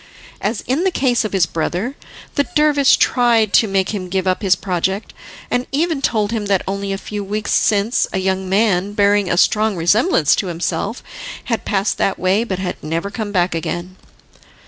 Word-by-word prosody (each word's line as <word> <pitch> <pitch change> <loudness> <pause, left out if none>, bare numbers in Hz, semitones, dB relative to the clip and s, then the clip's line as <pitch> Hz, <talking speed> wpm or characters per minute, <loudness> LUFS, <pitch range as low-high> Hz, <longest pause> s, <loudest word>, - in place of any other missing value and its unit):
As 210 +2 -1
in 270 +8 -1
the 380 - +3
case 255 -8 +1
of 215 - -3
his 190 -4 +3
brother, 175 - -3 0.4
the 285 - 0
dervish 295 -3 +4
tried 230 -4 +2
to 225 - +5
make 195 -1 0
him 190 -4 -4
give 190 0 -1
up 185 -1 0
his 195 -3 +3
project, 190 +2 -2 0.4
and 245 0 0
even 315 0 0
told 215 -5 0
him 215 -3 -2
that 195 -2 +1
only 200 0 -3
a 195 - -2
few 205 +1 -6
weeks 210 +2 -3
since 210 +2 +2
a - - -2
young 190 0 -1
man, 200 -1 +1
bearing 205 -2 +2
a 170 - 0
strong 215 +2 +3
resemblance 175 - +3
to 195 - -1
himself, 180 +6 -3 0.4
had 230 -2 -3
passed 200 0 0
that 195 - +1
way, 190 +4 +1
but 195 -6 -3
had 185 -1 -5
never 165 +6 -3
come 215 -2 -4
back 180 -3 +1
again. 175 +2 -4
200 Hz, 190 wpm, -18 LUFS, 185-225 Hz, 0.4 s, to